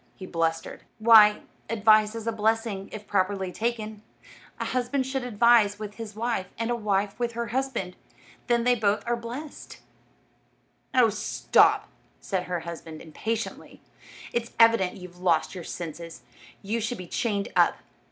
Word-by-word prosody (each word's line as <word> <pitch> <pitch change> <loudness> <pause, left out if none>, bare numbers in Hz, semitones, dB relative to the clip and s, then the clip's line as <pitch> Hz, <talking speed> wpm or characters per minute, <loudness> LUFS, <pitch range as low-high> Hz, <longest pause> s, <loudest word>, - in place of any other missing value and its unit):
he 190 - -9
blustered. 165 -2 -2 0.2
"Why, 215 -2 +7 0.3
advice 215 -1 +4
is 225 -1 -6
a 230 - 0
blessing, 220 -2 -1
if 215 -1 -8
properly 190 -1 0
taken. 220 -1 -3 0.6
A - - -2
husband 255 +2 -1
should 265 0 -3
advise 230 -3 +4
with 210 -1 -7
his 220 -2 -7
wife, 225 -4 -2
and 230 +1 -1
a - - +1
wife 205 -2 -1
with 240 -1 -1
her 235 0 -3
husband; 240 -7 -2 0.5
then 240 -2 +2
they 250 +1 +4
are 210 +3 +1
both 235 - -9
blessed." 260 +6 -8 1.2
"Oh, 245 -3 +6
stop," 210 - +2 0.3
said 185 -3 -3
her 180 -2 -3
husband, 165 -1 -8
impatiently; 220 +8 -5 0.5
"it's 235 0 -2
evident 230 -5 +4
you've 180 -1 -12
lost 175 -3 +1
your 180 -3 -7
senses. 165 -4 -7 0.4
You 220 +4 -2
should 230 +2 -2
be 180 - -7
chained 200 +2 -2
up." - - +4
215 Hz, 150 wpm, -26 LUFS, 190-235 Hz, 1.2 s, Why